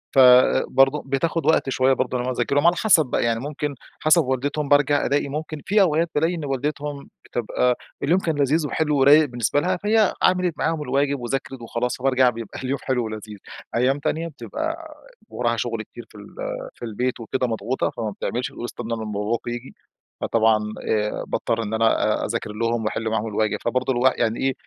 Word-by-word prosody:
فبرضو 135 Hz, +2 st, +5 dB
بتاخد 155 Hz, +4 st, -1 dB
وقت 160 Hz, -3 st, +3 dB
شوية 130 Hz, 0 st, +3 dB
برضو 130 Hz, 0 st, -1 dB
على 125 Hz, -, -2 dB
ما -, -, -1 dB
أنا -, -, -6 dB
أذاكر 120 Hz, +3 st, 0 dB
لهم 145 Hz, +3 st, +4 dB
على 175 Hz, -, +4 dB
حسب 180 Hz, -8 st, +4 dB
بقى، 125 Hz, -, -1 dB
يعني 115 Hz, -1 st, +1 dB
ممكن 145 Hz, +2 st, -4 dB, 0.3 s
حسب 155 Hz, +2 st, +5 dB
والدتهم 140 Hz, +3 st, -2 dB
بارجع 145 Hz, 0 st, +3 dB
ألاقي 140 Hz, 0 st, +1 dB
ممكن 155 Hz, +1 st, -5 dB
في 205 Hz, +1 st, +3 dB
أوقات 165 Hz, -1 st, +2 dB
بالاقي 165 Hz, +4 st, +1 dB
إن 160 Hz, -3 st, -5 dB
والدتهم 145 Hz, +1 st, -3 dB, 0.2 s
بتبقى 125 Hz, +1 st, 0 dB, 0.3 s
اليوم 170 Hz, +6 st, +3 dB
كان 165 Hz, -4 st, -1 dB
لذيذ 145 Hz, +3 st, +2 dB
وحلو 150 Hz, 0 st, 0 dB
ورايق 145 Hz, +3 st, +7 dB
بالنسبة 120 Hz, 0 st, 0 dB
لها، 185 Hz, +2 st, 0 dB
فهي 210 Hz, +1 st, +2 dB
عملت 180 Hz, -2 st, +3 dB
معاهم 160 Hz, -1 st, -1 dB
الواجب 140 Hz, +1 st, 0 dB
وذاكرت 130 Hz, +1 st, -4 dB
وخلاص، 120 Hz, +1 st, -2 dB
فبارجع 130 Hz, -1 st, +3 dB
بيبقى 115 Hz, -3 st, -7 dB
اليوم 135 Hz, +1 st, -2 dB
حلو 125 Hz, -3 st, 0 dB
ولذيذ 110 Hz, -1 st, -7 dB, 0.4 s
أيام 130 Hz, +4 st, +2 dB
تانية 165 Hz, +3 st, -2 dB
بتبقى 320 Hz, -, -6 dB, 0.3 s
وراها -, -, -1 dB
شغل -, -, -2 dB
كتير -, -, -12 dB
في -, -, -21 dB
ال -, -, -13 dB, 0.4 s
في -, -, -7 dB
البيت 120 Hz, +3 st, -2 dB
وكده 125 Hz, +3 st, -2 dB
مضغوطة 115 Hz, +2 st, -1 dB
فما 110 Hz, -3 st, -4 dB
بتعملش، 120 Hz, +5 st, -3 dB
تقول 120 Hz, -, -7 dB
استنوا 115 Hz, -1 st, -4 dB
لما 110 Hz, -1 st, -5 dB
باباكم 105 Hz, +4 st, -2 dB
ييجي. 120 Hz, +2 st, -7 dB, 0.5 s
فطبعًا 110 Hz, -1 st, +3 dB, 0.3 s
آآ 105 Hz, -1 st, 0 dB
باضطر 115 Hz, -1 st, -1 dB
إن 105 Hz, 0 st, -5 dB
أنا 110 Hz, -1 st, +2 dB
آآ -, -, -1 dB
أذاكر 115 Hz, -1 st, -3 dB
لهم 115 Hz, +1 st, -1 dB
وأحل 110 Hz, +1 st, -2 dB
معاهم 110 Hz, 0 st, -1 dB
الواجب. 110 Hz, 0 st, 0 dB
فبرضو 130 Hz, +2 st, 0 dB
الواح 130 Hz, +1 st, +3 dB
يعني 110 Hz, +1 st, 0 dB
إيه؟ 135 Hz, 0 st, +1 dB
130 Hz, 190 wpm, -23 LUFS, 115-150 Hz, 0.5 s, ورايق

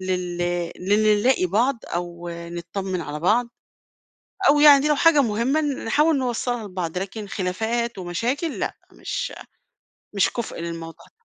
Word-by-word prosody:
لل 180 Hz, -2 st, -2 dB, 0.4 s
لل 210 Hz, +2 st, +3 dB
نلاقي 250 Hz, -6 st, +3 dB
بعض 230 Hz, +7 st, +1 dB
أو 175 Hz, 0 st, -5 dB
نطّمِن 170 Hz, +2 st, -5 dB
على 150 Hz, -2 st, -5 dB
بعض 230 Hz, +7 st, +2 dB, 1.0 s
أو 295 Hz, -, +5 dB
يعني 290 Hz, -1 st, +7 dB
لو 300 Hz, -, +3 dB
حاجة 320 Hz, -1 st, +5 dB
مهمة 240 Hz, +6 st, +1 dB
نحاول 295 Hz, +2 st, +1 dB
نوصَّلها 245 Hz, -2 st, -2 dB
لبعض، 180 Hz, -3 st, -4 dB
لكن 200 Hz, +2 st, -5 dB
خلافات 220 Hz, +5 st, -2 dB
ومشاكل، 235 Hz, -, -2 dB
لأ، -, -, -3 dB, 0.2 s
مش -, -, -4 dB, 0.8 s
مش 200 Hz, -, +3 dB
كُفء 235 Hz, -7 st, -5 dB
للموضوع 165 Hz, 0 st, -7 dB
ده. 465 Hz, -, -30 dB
210 Hz, 130 wpm, -23 LUFS, 175-250 Hz, 1.0 s, يعني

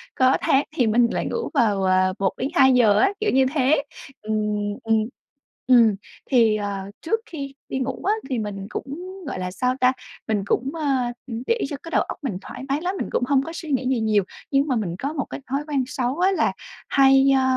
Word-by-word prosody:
có 260 Hz, 0 st, +4 dB
tháng 270 Hz, +2 st, +3 dB
thì 245 Hz, -8 st, +2 dB
mình 235 Hz, +2 st, +4 dB
lại -, -, -2 dB
ngủ 465 Hz, -, -3 dB
vào, 210 Hz, -8 st, +2 dB
ờ, 185 Hz, 0 st, +3 dB
1:00-2:00 250 Hz, -, +3 dB
á, 395 Hz, -, +3 dB
kiểu 430 Hz, 0 st, +1 dB
như 265 Hz, 0 st, +4 dB
thế, 280 Hz, +1 st, +3 dB, 0.4 s
ừm, 215 Hz, 0 st, -3 dB, 0.5 s
ừm. 225 Hz, 0 st, +2 dB, 0.7 s
Ừm, 230 Hz, -5 st, +6 dB, 0.4 s
thì, 230 Hz, -4 st, +5 dB
ờ, 205 Hz, -1 st, -3 dB, 0.2 s
trước 450 Hz, +8 st, 0 dB
khi 275 Hz, -4 st, -7 dB, 0.2 s
đi 265 Hz, -, -2 dB
ngủ 260 Hz, 0 st, -3 dB
á, 410 Hz, +3 st, +2 dB, 0.2 s
thì 255 Hz, -, -1 dB
mình 200 Hz, -2 st, -5 dB
cũng, -, -, -4 dB, 0.4 s
gọi 225 Hz, -, -4 dB
là, 180 Hz, 0 st, -3 dB
sao 250 Hz, +6 st, 0 dB
ta, 255 Hz, 0 st, +5 dB, 0.4 s
mình 210 Hz, -3 st, 0 dB
cũng, 260 Hz, +6 st, 0 dB
ơ, 310 Hz, -3 st, -2 dB, 0.4 s
ừm, 235 Hz, 0 st, -5 dB
để 465 Hz, 0 st, +1 dB
cho 290 Hz, -, -4 dB
cái 330 Hz, -, -8 dB
đầu -, -, +3 dB
óc -, -, -5 dB
mình 225 Hz, -10 st, -3 dB
thoải -, -, -9 dB
mái 285 Hz, +3 st, 0 dB
lắm, 365 Hz, +2 st, -2 dB
mình -, -, -3 dB
cũng -, -, 0 dB
hông 275 Hz, -1 st, +3 dB
có 325 Hz, -, -6 dB
suy 315 Hz, -3 st, -6 dB
nghĩ 255 Hz, -1 st, 0 dB
gì 255 Hz, -3 st, +1 dB
nhiều, 215 Hz, -3 st, +2 dB, 0.3 s
nhưng 275 Hz, +2 st, +3 dB
mà 260 Hz, -, +1 dB
mình 185 Hz, -7 st, -2 dB
có 280 Hz, +3 st, -3 dB
một 280 Hz, -, -2 dB
cái -, -, -6 dB
thói 275 Hz, +2 st, 0 dB
quen 280 Hz, -3 st, 0 dB
xấu 255 Hz, +3 st, -2 dB
á 375 Hz, +2 st, +4 dB
là 380 Hz, -, +1 dB, 0.4 s
hay, 270 Hz, 0 st, +5 dB
ơ, 265 Hz, -, +3 dB
260 Hz, 220 wpm, -23 LUFS, 220-280 Hz, 0.7 s, Ừm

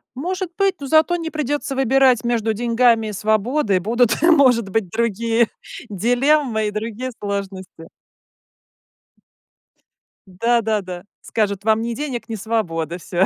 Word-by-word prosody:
Может 365 Hz, +6 st, -3 dB
быть, 390 Hz, -1 st, +2 dB
но 280 Hz, -, -6 dB
зато 315 Hz, +4 st, +3 dB
не 330 Hz, -1 st, -4 dB
придется 290 Hz, -2 st, -3 dB
выбирать 265 Hz, -2 st, +3 dB
между 230 Hz, -2 st, 0 dB
деньгами 230 Hz, 0 st, +2 dB
и 210 Hz, -, -5 dB
свободой. 215 Hz, +1 st, +1 dB
Будут, 230 Hz, +5 st, +1 dB
может 260 Hz, -, +4 dB
быть, 195 Hz, -2 st, -1 dB
другие 230 Hz, +1 st, +1 dB, 0.4 s
дилеммы 245 Hz, +2 st, +1 dB
и -, -, -2 dB
другие 225 Hz, +4 st, -4 dB
сложности. 195 Hz, -4 st, -6 dB, 2.4 s
Да, 230 Hz, +6 st, +1 dB
да, 215 Hz, -1 st, 0 dB
да, 180 Hz, -2 st, -8 dB, 0.2 s
скажут: 200 Hz, -3 st, -2 dB
"Вам 220 Hz, +1 st, +2 dB
ни 235 Hz, +1 st, -3 dB
денег, 265 Hz, -5 st, -5 dB
ни 225 Hz, -, -3 dB
свободы. 175 Hz, -7 st, -2 dB
Всё". 180 Hz, +1 st, 0 dB
230 Hz, 130 wpm, -20 LUFS, 205-260 Hz, 2.4 s, может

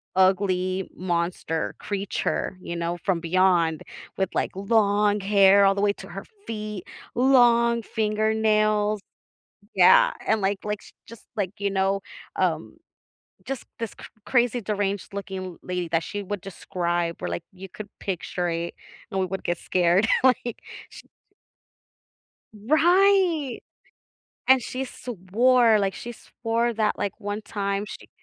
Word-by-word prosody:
ugly 185 Hz, 0 st, +2 dB
monster 170 Hz, -2 st, -2 dB
creature, 200 Hz, -1 st, -2 dB
you 170 Hz, -, -6 dB
know, 170 Hz, +1 st, -2 dB
from 185 Hz, -3 st, +1 dB
beyond, 170 Hz, -2 st, +2 dB, 0.3 s
with, 190 Hz, -2 st, 0 dB
like, -, -, 0 dB
long 205 Hz, 0 st, +2 dB
hair 200 Hz, 0 st, +5 dB
all 195 Hz, 0 st, +4 dB
the 200 Hz, -, -1 dB
way 205 Hz, 0 st, +3 dB
to -, -, -11 dB
her -, -, -7 dB, 0.2 s
feet, 210 Hz, -3 st, -5 dB, 0.3 s
long 235 Hz, -2 st, +4 dB
fingernails 215 Hz, -1 st, +1 dB, 0.8 s
Yeah, 180 Hz, -2 st, +6 dB
and, 220 Hz, 0 st, +2 dB
like 195 Hz, 0 st, 0 dB
like, 210 Hz, -1 st, -3 dB
she -, -, -16 dB
just, 230 Hz, -, -13 dB
like, 195 Hz, -3 st, -1 dB
you 200 Hz, 0 st, -1 dB
know, 195 Hz, 0 st, +1 dB, 0.4 s
um -, -, -1 dB, 0.7 s
just 270 Hz, -2 st, -4 dB
this 230 Hz, -1 st, -4 dB
cr -, -, -13 dB, 0.2 s
crazy 245 Hz, -1 st, +2 dB
deranged 200 Hz, -1 st, -2 dB
looking 190 Hz, -3 st, -6 dB
lady 180 Hz, -1 st, -3 dB
that 165 Hz, 0 st, +1 dB
she 205 Hz, +5 st, -5 dB
would 200 Hz, 0 st, -4 dB
describe 175 Hz, -2 st, -3 dB
where, -, -, -3 dB
like, 85 Hz, -, -3 dB
you 190 Hz, +1 st, -10 dB
could 210 Hz, +3 st, -9 dB
picture 180 Hz, -1 st, -3 dB
it, 170 Hz, 0 st, -2 dB, 0.4 s
and 190 Hz, -, -1 dB
we 185 Hz, -, +1 dB
would 190 Hz, +1 st, -5 dB
get 175 Hz, -1 st, -1 dB
scared, 180 Hz, +3 st, +2 dB, 0.2 s
like, 245 Hz, -2 st, +2 dB, 0.3 s
she'd -, -, -14 dB, 1.4 s
Right. 330 Hz, -, +3 dB, 0.9 s
And 265 Hz, -1 st, +6 dB
she 255 Hz, +2 st, -4 dB
swore, 235 Hz, 0 st, +2 dB
like, 195 Hz, -1 st, 0 dB
she 240 Hz, -, -7 dB
swore 235 Hz, +1 st, -2 dB
that, 215 Hz, -1 st, 0 dB
like, 205 Hz, -1 st, -2 dB
one 205 Hz, 0 st, -4 dB
time 200 Hz, -1 st, -2 dB
she -, -, -10 dB
200 Hz, 140 wpm, -25 LUFS, 185-220 Hz, 1.4 s, Yeah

